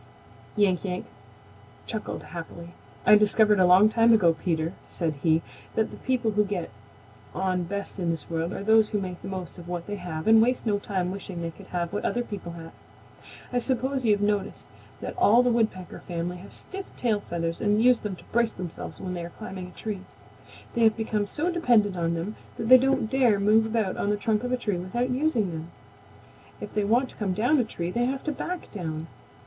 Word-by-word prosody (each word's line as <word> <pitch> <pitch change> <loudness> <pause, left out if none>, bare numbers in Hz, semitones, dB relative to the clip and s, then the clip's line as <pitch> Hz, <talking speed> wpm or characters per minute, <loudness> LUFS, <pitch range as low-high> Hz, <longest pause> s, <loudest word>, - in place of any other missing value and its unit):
Yank 200 -4 +2
Yank 180 -2 -3 0.8
chuckled 220 -2 -5
happily. 170 0 -8 0.3
"I - - +7
discovered 210 0 +4
a 185 - +6
long 185 +4 +7
time 230 +1 +4
ago, 175 -7 +5
Peter," 165 0 -1
said 165 -3 -2
he, 160 -1 +3 0.3
"that 220 0 +1
the - - -9
people 250 -4 0
who 210 0 +3
get 195 - -3 0.6
on 185 -1 0
best 200 +2 -5
in 175 -2 0
this 165 -3 -3
world 165 +1 -2
are 200 - -5
those 220 0 +5
who 210 - 0
make 180 -2 -5
the - - -7
most 185 -2 -6
of 170 - -11
what 175 -1 -4
they 205 0 -4
have 160 -4 -5
and 220 0 +7
waste 245 +2 +1
no 205 -2 +1
time 185 -3 -2
wishing 185 -3 -6
they 165 - -3
could 190 +3 -14
have 170 -1 -3
what 205 - -2
other 245 - 0
people 195 -7 -7
have. 165 -1 -9 0.8
I 245 - +3
suppose 260 +1 -1
you 220 -3 +4
have 205 - -1
noticed 205 -1 -1 0.3
that - - -5
all 240 - +6
the 250 - +3
Woodpecker 215 -6 -1
family 175 +1 -3
have 185 +3 -12
stiff 390 0 -7
tail 225 -4 +1
feathers 165 -3 -3
and 210 0 +2
use 250 -1 +5
them 205 -3 -4
to - - -16
brace 235 -1 +2
themselves 180 -3 -7
when 185 - -4
they 175 -1 -4
are 170 - -6
climbing 185 -1 -7
a - - -12
tree. 210 -4 -4 0.7
They 235 - 0
have 220 -1 +5
become 215 -2 -1
so 325 - -1
dependent 235 - +3
on 170 -1 0
them 180 +6 -4 0.2
that 225 - -3
they 255 0 +10
don't 265 -3 +2
dare 240 -4 +3
move 215 +2 +4
about 220 -4 -1
on 200 - 0
the 210 - +1
trunk 215 +1 0
of 250 - -2
a 255 - +2
tree 210 -6 -1
without 240 +8 -2
using 250 - +1
them. 160 0 -6 0.9
If - - -7
they 210 -1 +1
want 245 +5 +2
to - - -11
come 195 -4 -1
down 245 +8 +3
a - - +3
tree 175 -5 -4
they 240 +5 +1
have 265 +1 -2
to 310 - -1
back 355 +5 -5
down. 160 -5 -4
205 Hz, 215 wpm, -26 LUFS, 180-230 Hz, 0.9 s, they